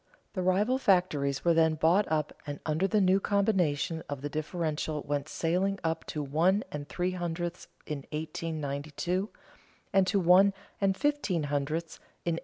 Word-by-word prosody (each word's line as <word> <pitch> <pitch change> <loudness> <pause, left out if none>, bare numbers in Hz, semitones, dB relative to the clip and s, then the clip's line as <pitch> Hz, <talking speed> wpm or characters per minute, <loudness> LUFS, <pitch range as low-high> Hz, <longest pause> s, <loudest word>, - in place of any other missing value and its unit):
The 185 - -2
rival 205 +8 +2
factories 155 - +2
were 170 - +5
then 160 -1 +4
bought 165 +5 +3
up 155 -2 0
and 145 0 -4
under 160 +5 +1
the 210 +2 +2
new 190 0 +4
combination 180 -6 +1
the 145 0 -4
differential 155 -1 -2
went 145 -1 -2
sailing 185 +4 0
up 160 0 -1
to 150 - -3
one 170 +9 +2
and 145 -1 -6
three 180 +1 -1
hundredths 175 -1 -4 0.2
in 150 -2 -3
1892, 155 +3 -3 0.6
and 195 -1 +4
to 200 +1 +2
one 190 +3 +5 0.3
and 195 -1 +2
fifteen 290 - 0
hundredths 155 +4 -2 0.3
in 170 - +1
1893. - - -3
170 Hz, 155 wpm, -29 LUFS, 150-190 Hz, 0.6 s, were